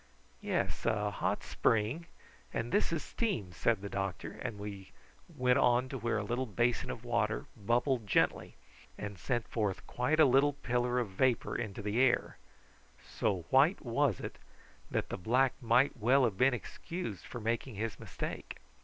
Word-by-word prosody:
"Yes, - - -1
a 105 -2 +1
hot - - -1
spring, 115 +10 +1 0.4
and 115 - -3
this 205 - +2
is 160 -3 -1
steam," 190 - -2
said 110 -1 +1
the - - -3
doctor, 95 -2 -4
as 120 -4 -3
we 100 -2 -8 0.4
went 125 0 +2
on 125 +1 +3
to 135 - -4
where 115 -1 0
a 110 - -1
little 120 +5 -2
basin 120 +3 0
of 120 0 -6
water 110 -2 0
bubbled 120 +2 +1
gently, - - +1 0.4
and 105 -3 -6
sent 120 +5 -1
forth 105 -4 -2
quite 125 +6 0
a 155 - +9
little 135 +2 +4
pillar 125 -2 0
of 120 -4 0
vapour 120 +5 +1
into 105 -3 -4
the 105 +3 0
air; 130 -2 +2 0.7
so 100 -5 0
white 140 +6 +4
was 120 -2 +1
it - - -7 0.5
that - - -1
the - - -3
black 125 +7 +2
might 120 +4 +3
well 130 +4 +4
have 115 -6 +2
been 130 +5 +4
excused 125 - -6
for 120 - -7
making 115 +2 -2
his 105 -1 -3
mistake. - - -6
120 Hz, 165 wpm, -32 LUFS, 105-130 Hz, 0.7 s, a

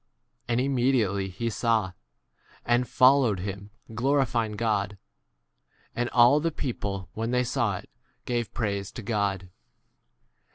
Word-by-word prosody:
43 - - -3
And 125 - +2
immediately 120 -7 +1
he 100 +6 -4
saw, 110 -3 +1 0.7
and 120 +1 +2
fol 130 +4 +5
lowed 105 -8 0
him, 100 +1 -6 0.2
glorifying 120 -2 +1
God. 105 -2 -1 1.0
And 120 0 -1
all 120 +4 +5
the 165 +2 0
people 100 - -4
when 115 +1 -3
they 125 0 +2
saw 120 - 0
it - - -11 0.4
gave 120 -2 -2
praise 100 -4 -2
to 120 - -7
God. 100 -4 -1
115 Hz, 130 wpm, -27 LUFS, 100-125 Hz, 1.0 s, fol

